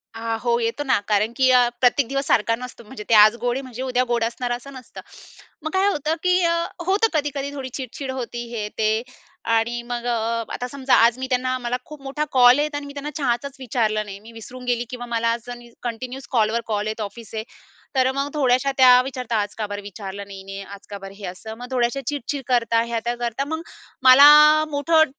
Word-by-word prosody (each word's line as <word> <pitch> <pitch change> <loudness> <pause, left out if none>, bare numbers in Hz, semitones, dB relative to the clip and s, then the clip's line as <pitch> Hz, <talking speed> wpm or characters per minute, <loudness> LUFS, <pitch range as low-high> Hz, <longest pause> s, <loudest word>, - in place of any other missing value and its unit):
आ 225 0 -2
हो. 235 -1 +2
येतो 230 +5 -2
ना. 260 -6 +2
कारण 210 +1 +2
की 260 -1 +3
अ, 250 -1 +5
प्रत्येक 250 0 +3
दिवस 275 +1 -2
सारखा 230 +1 +2
नसतो. 245 0 -10
म्हणजे 215 0 -9
ते - - +3
आज 215 +2 +7
गोड 245 0 0
आहे 270 - -2
म्हणजे 255 -2 -8
उद्या 255 -1 +1
गोड 235 -1 0
असणार 240 +1 -2
असं 250 +3 -5
नसतं. 255 -2 -11 0.6
मग 315 - -3
काय 385 +1 +3
होतं 310 -4 0
की 365 0 +3
अ, 335 0 +2 0.3
होतं 405 +4 +3
कधी-कधी 285 -2 -2
थोडी 265 -2 -5
चिडचिड 265 +1 -5
होती, 240 -2 -5
हे, 210 -2 -2
ते 220 0 +1 0.5
आणि 235 +2 0
मग 240 0 -5
अ, 230 -1 -1
आता 250 - -3
समजा 270 -2 +2
आज 235 +1 +2
मी 260 - -3
त्यांना 255 0 0
मला 245 0 -2
खूप 305 -2 -11
मोठा 275 +2 -3
कॉल 250 +1 +6
आहे 295 - +2
आणि 290 - -6
मी 280 - -9
त्यांना 290 +1 -5
चहाचचं 270 -1 -1
विचारलं 220 -4 -1
नाही. 200 -1 -8
मी 220 +2 -14
विसरून 245 +3 -10
गेली 245 -1 0
किंवा 245 0 -6
मला 230 0 +1
आज 240 +1 -15 0.3
कंटिन्यूस 250 +2 -5
कॉलवर 230 -1 +2
कॉल 210 -1 -1
आहेत 220 +1 -4
ऑफिसचे 220 +1 -6 0.5
तर 260 0 +3
मग 275 +1 -1
थोड्याशा 275 -1 +2
त्या 250 -1 +8
विचारतात, 250 -4 -3
"आज 205 -1 -2
का 215 - -2
बरं 205 0 -5
विचारलं 200 0 -7
नाही? 195 -1 -10
नाही 195 0 -7
आज 200 - -17
का 200 - -6
बरं 195 0 -10
हे 200 0 -9
असं?" 205 +5 -8
मग 245 - -8
थोड्याशा 250 +2 0
चिडचिड 285 -1 -3
करतात. 230 -2 +2
ह्या-त्या 235 +1 -2
करतात. 240 +3 -2
मग 320 +1 -3 0.4
मला 260 +2 +9
आ 305 +1 +6
मोठं 315 +3 +4
245 Hz, 215 wpm, -22 LUFS, 225-270 Hz, 0.6 s, मला